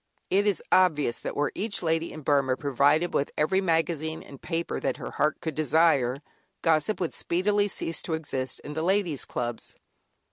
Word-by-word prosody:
It 200 +2 +3
is 200 - +1
obvious 155 -9 +3
that - - -5
were 145 0 0
each 205 -2 -2
lady 165 0 0
in 155 - -8
Burmah 135 -3 +2
provided 145 +5 +2
with 140 - +1
every 190 +6 +2
magazine 160 -2 0
and 140 - -13
paper 170 -1 -3
that - - -1
her - - -6
heart 150 0 0
could 160 - -3
desire, 155 -4 +2 0.4
gossip 160 +5 +2
would 175 - -2
speedily 205 +4 +1
cease 165 -4 -3
to 160 - -2
exist, 135 -5 -4
in 150 - -7
the 160 - -2
Ladies' 180 -4 +1
Clubs. 120 -1 -5
160 Hz, 175 wpm, -27 LUFS, 145-175 Hz, 0.4 s, It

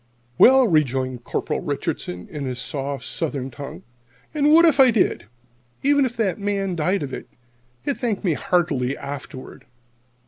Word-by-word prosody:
"Well," 265 0 +7
rejoined 130 - 0
Corporal - - -2
Richardson, 90 0 -4
in 145 -3 -6
his 125 -2 -4
soft 140 +1 -4
Southern 140 -5 -3
tongue, 150 +7 -9 0.5
"and 295 -1 +3
what 335 +2 +7
if 300 -4 +3
I 265 -1 +8
did? 220 - +1 0.6
Even 285 0 +4
if 240 -1 -5
that 200 -6 0
man 200 -2 -1
died 170 +2 0
of 135 - -6
it, - - -7 0.6
he'd 280 - -1
thank 230 -6 -2
me 175 -5 +2
heartily 145 -6 0
afterward. 135 -3 -8
165 Hz, 150 wpm, -22 LUFS, -, 0.6 s, I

